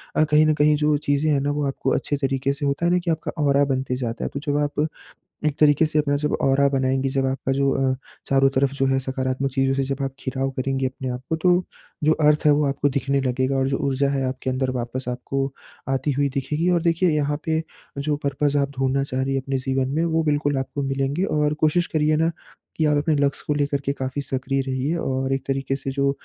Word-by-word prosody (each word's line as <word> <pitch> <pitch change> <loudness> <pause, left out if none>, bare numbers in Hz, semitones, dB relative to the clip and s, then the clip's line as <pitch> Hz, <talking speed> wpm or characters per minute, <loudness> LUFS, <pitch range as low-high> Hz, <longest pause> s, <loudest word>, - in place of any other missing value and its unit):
अ, 155 - +4
कहीं 155 0 +4
न 155 - +4
कहीं 150 0 +4
जो 150 0 +2
चीज़ें 145 +1 +1
हैं 140 - +3
ना 145 - 0
वो 145 0 -1
आपको 135 - -2
अच्छे 145 - -1
तरीके 135 0 0
से 145 +1 -4
होता 140 +4 0
है 175 - +3
ना 180 - +3
कि 170 -1 -1
आपका 160 - -2
ऑरा 140 0 +4
बनते 130 -2 -1
जाता 120 -2 -4
है। - - -2
तो 140 - -3
जब 145 0 +1
आप 150 +1 0 0.6
एक 145 - 0
तरीके 150 +1 +5
से 155 0 0
अपना 145 -1 +1
जब 150 +1 -1
ऑरा 140 +1 +4
बनाएँगी, 135 0 +1
जब 135 0 0
आपका 135 0 -1
जो 140 0 +2
अ, 135 -1 +1 0.3
चारों 135 0 +4
तरफ़ 135 +1 +2
जो 135 -1 +1
है 135 0 +2
सकारात्मक 130 +1 -2
चीज़ों 135 0 +1
से 135 - 0
जब 135 +1 -3
आप 135 - -1 0.2
घिराव 135 +1 -1
करेंगी 135 0 0
अपने 130 0 -5
आप 125 +1 -4
को 160 - 0
तो 180 +2 +3 0.4
जो 155 - +5
अर्थ 150 -1 +3
है - - +7
वो 145 +1 +2
आपको 140 +1 +1
दिखने 140 0 0
लगेगा 130 +1 0
और 135 0 +1
जो 135 - 0
ऊर्जा 140 +1 +1
है 135 -1 0
आपके 130 0 -3
अंदर 130 0 0
वापस 125 +1 -4
आपको 135 +2 -2 0.4
आती 135 +2 0
हुई 140 +1 +1
दिखेगी। 150 +6 -1
और 170 -2 +2
देखिए 170 +1 +2
यहाँ 145 -1 0
पे 160 0 0 0.4
जो 145 +1 0
पर्पज़ 145 +1 +1
आप 140 0 0
ढूँढना 135 +1 +1
चाह 130 -1 -2
रही 135 0 -1
हैं 135 - +1
अपने 135 0 -2
जीवन 130 0 -1
में 165 +2 +1
वो 165 -1 +1
बिल्कुल 145 -1 +1
आपको 140 +1 -3
मिलेंगे 135 +6 -1
और 150 -3 +1
कोशिश 170 +3 +3
करिए 155 -1 +1
ना 165 +1 +2 0.5
कि 160 - +2
आप 150 -1 +3
अपने 150 +2 +2
लक्ष्य 140 0 0
को 150 - +1
लेकर 145 -1 0
के 140 - 0
काफ़ी 135 +1 -4
सक्रिय 135 0 -2
रहिए 135 +4 -1
और 135 -3 -1
एक 135 -1 0
तरीके 135 0 -1
से 135 0 -5
जो 140 0 +1
140 Hz, 240 wpm, -23 LUFS, 135-150 Hz, 0.6 s, है